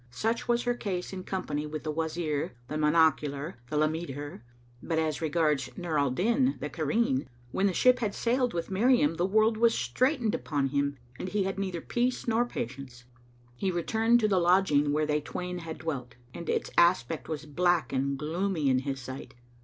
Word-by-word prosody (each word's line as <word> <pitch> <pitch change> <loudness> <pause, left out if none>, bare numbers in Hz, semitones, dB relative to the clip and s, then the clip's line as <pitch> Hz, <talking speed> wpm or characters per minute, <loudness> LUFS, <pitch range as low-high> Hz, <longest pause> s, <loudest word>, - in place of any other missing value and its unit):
Such 225 - -2
was 240 0 +2
her 245 - +1
case 195 -6 -4
in 185 -1 -6
company 150 -6 -3
with 155 0 -5
the 155 - -2
Wazir, 155 -3 -2
the - - -6
monocular, 150 0 +2
the 150 - -1
lameter; 150 -4 -2 0.4
but 165 - -2
as 160 -1 0
regards 150 -4 +1
Nur 170 -5 -1
al 140 -1 +2
Din 235 - +1
the 150 - -4
Cairene, 230 - 0 0.2
when 195 - +2
the - - +2
ship 250 +7 +4
had 215 -4 -2
sailed 245 +1 +1
with 170 +2 -4
Miriam, 190 - +3
the 175 - +1
world 220 +2 +3
was 230 0 +4
straitened 240 - +1
upon 140 -3 -1
him 140 0 0 0.2
and 185 - -4
he 205 0 0
had 195 0 -3
neither 185 -4 -3
peace 245 +1 -1
nor 235 +1 +3
patience. 130 - -6 0.5
He 190 +10 -1
returned 225 +7 +2
to 215 - +3
the 195 -3 +3
lodging 170 -5 +3
where 155 +1 +1
they 150 0 0
twain 180 +4 -5
had 165 -2 -6
dwelt, 140 -6 -5 0.2
and 170 - -7
its - - -1
aspect 170 -5 +2
was 155 -1 -4
black 170 -2 +1
and 135 +1 0
gloomy 160 +1 -1
in 130 -1 +3
his 135 0 -3
sight. 130 +1 -8
165 Hz, 185 wpm, -29 LUFS, 145-200 Hz, 0.5 s, ship